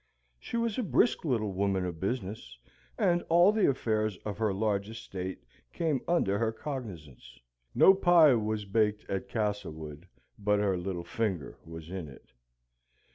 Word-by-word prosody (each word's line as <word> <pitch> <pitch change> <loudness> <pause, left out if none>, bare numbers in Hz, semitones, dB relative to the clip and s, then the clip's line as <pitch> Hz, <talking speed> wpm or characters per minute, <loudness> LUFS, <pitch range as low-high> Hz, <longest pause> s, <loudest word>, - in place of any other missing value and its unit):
She 235 - -4
was 230 0 -1
a - - +2
brisk 225 -2 +2
little 110 -8 0
woman 95 -1 0
of 85 -3 -5
business, 95 - -4 0.4
and 175 0 +2
all 175 +4 +6
the 215 -6 +3
affairs 110 -6 0
of 105 -1 -4
her 110 -2 +1
large 100 0 -1
estate 95 -4 -6 0.3
came 155 -6 0
under 100 - +2
her 115 -1 +1
cognisance. 85 - -8 0.4
No 190 - +8
pie 175 -6 +6
was 110 -2 -1
baked 105 +1 0
at 95 -1 -3
Castlewood 85 -7 -4 0.3
but 105 0 +2
her 100 -2 +1
little 90 -1 -4
finger 90 -5 -3
was 80 0 -9
in 95 -4 -5
it. 70 -2 -15
105 Hz, 150 wpm, -30 LUFS, 95-125 Hz, 0.4 s, No